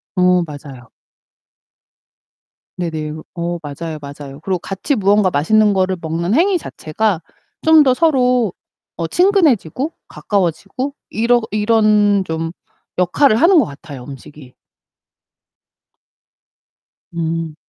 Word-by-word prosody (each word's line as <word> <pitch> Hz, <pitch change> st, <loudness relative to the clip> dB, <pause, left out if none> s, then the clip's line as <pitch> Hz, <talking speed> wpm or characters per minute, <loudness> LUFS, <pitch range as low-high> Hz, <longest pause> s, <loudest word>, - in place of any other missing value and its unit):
어 180 Hz, -1 st, +3 dB
맞아요. 140 Hz, -4 st, -11 dB, 1.9 s
네네. 160 Hz, -3 st, -3 dB, 0.2 s
어 170 Hz, 0 st, -3 dB
맞아요, 155 Hz, +2 st, -6 dB
맞아요. 140 Hz, 0 st, -9 dB
그리고 185 Hz, -1 st, -2 dB
같이 195 Hz, -, -2 dB
무언가 200 Hz, -1 st, +3 dB
맛있는 210 Hz, +8 st, +3 dB
거를 185 Hz, -1 st, 0 dB
먹는 170 Hz, +4 st, -2 dB
행위 365 Hz, +4 st, +3 dB
자체가 190 Hz, -, -2 dB, 0.4 s
좀 320 Hz, -1 st, +6 dB
더 260 Hz, -, +3 dB
서로 250 Hz, -, +2 dB, 0.4 s
어 165 Hz, -, -2 dB
친근해지고 315 Hz, -, +2 dB, 0.2 s
가까워지고 200 Hz, -, -2 dB, 0.2 s
이러 235 Hz, +2 st, +2 dB
이런 210 Hz, -2 st, +3 dB
좀 165 Hz, 0 st, -3 dB, 0.5 s
역할을 215 Hz, +8 st, +3 dB
하는 340 Hz, +7 st, +5 dB
것 265 Hz, -, +3 dB
같아요, 140 Hz, -3 st, -10 dB
음식이. 135 Hz, 0 st, -12 dB, 2.6 s
음. 165 Hz, -1 st, -3 dB
185 Hz, 225 characters per minute, -18 LUFS, 160-230 Hz, 2.6 s, 좀